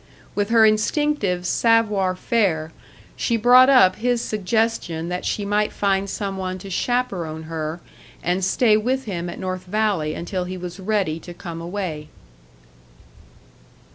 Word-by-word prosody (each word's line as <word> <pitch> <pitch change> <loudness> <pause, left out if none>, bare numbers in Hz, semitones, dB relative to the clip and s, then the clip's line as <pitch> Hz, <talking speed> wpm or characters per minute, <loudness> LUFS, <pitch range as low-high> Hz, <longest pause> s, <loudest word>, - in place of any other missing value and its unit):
With 205 0 -1
her 225 -1 +6
instinctive 215 - +1
savoir 210 -3 +2
faire, 180 -7 0 0.4
she 235 - 0
brought 250 +3 +7
up 190 -9 +6
his 245 +1 +1
suggestion 210 -6 -1
that 180 0 -4
she 205 - -1
might 210 +1 +1
find 195 -1 0
some 195 -1 -4
one 185 -1 -3
to 195 +1 -9
chaperon 180 -9 -2
her, 160 +1 -4 0.4
and 180 +2 0
stay 215 +4 +3
with 255 +5 -1
him 175 -4 -4
at - - -7
North 185 -1 -4
Valley 195 -6 0
until 180 +1 -3
he 185 +1 -5
was 180 +1 -7
ready 190 -5 -1
to 175 +1 -11
come 170 -2 -7
away. 170 -4 -5
195 Hz, 140 wpm, -22 LUFS, 175-220 Hz, 0.4 s, brought